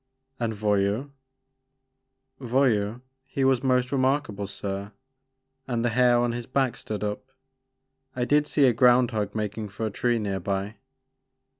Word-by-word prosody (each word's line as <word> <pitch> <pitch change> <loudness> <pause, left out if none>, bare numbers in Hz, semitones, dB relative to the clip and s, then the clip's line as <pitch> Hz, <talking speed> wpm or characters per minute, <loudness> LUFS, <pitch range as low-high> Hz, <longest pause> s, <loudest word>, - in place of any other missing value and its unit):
And 115 -2 -1
Voyou?" 105 +5 0 1.3
Voyou, 120 -3 +1 0.2
he 135 0 -3
was 130 -2 +3
most 125 -1 +1
remarkable 130 -7 0
sir, 100 +2 -5 0.7
and 120 -2 -1
the - - +3
hair 120 +1 +4
on 120 0 +1
his 120 0 -5
back 130 -1 0
stood 105 -1 -5
up. 105 +5 -4 0.8
I 125 -1 0
did 150 +3 +3
see 145 - +3
a 125 - +4
ground 125 +1 +4
hog 105 -2 -2
makin* 105 0 -3
for 105 +3 -4
a 110 - -2
tree 120 +3 +1
near 100 -3 -2
by." 100 +3 -3
120 Hz, 145 wpm, -26 LUFS, 105-130 Hz, 1.3 s, hair